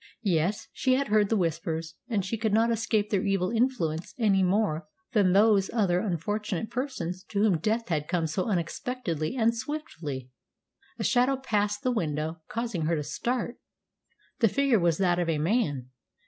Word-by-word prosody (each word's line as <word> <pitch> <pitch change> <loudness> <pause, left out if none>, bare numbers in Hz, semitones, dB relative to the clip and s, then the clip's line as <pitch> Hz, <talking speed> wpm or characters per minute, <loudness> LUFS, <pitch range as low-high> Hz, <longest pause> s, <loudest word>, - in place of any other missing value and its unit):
Yes, 185 +1 0
she 255 -1 +2
had 275 -1 -1
heard 210 -1 +3
the 225 - +2
Whispers, 165 -2 -2 0.2
and 205 -5 0
she 215 - -2
could 220 -1 -1
not 230 +1 +3
escape 220 -2 0
their 195 -3 +1
evil 195 -1 +1
influence 220 -10 0
any 205 -5 +3
more 180 -5 +1 0.3
than 200 -5 +4
those 200 -1 +4
other 195 -6 +2
unfortunate 205 +2 -2
persons 185 - -3
to 205 -1 -1
whom 195 -7 +3
death 220 +5 -1
had 150 -3 -1
come 175 -2 0
so 160 +4 -1
unexpectedly 175 - -2
and 230 -2 +2
swiftly. 170 - -5 0.7
A - - -3
shadow 255 +2 +3
passed 210 -2 -1
the 255 - +2
window, 160 -6 -2
causing 225 -9 -2
her 170 - +2
to 150 - -2
start. 240 - -2 0.8
The 230 - +5
figure 275 -1 +3
was 170 -2 +2
that 180 -2 +2
of 175 -1 0
a 160 - +1
man. 150 - 0
200 Hz, 170 wpm, -28 LUFS, 165-230 Hz, 0.8 s, The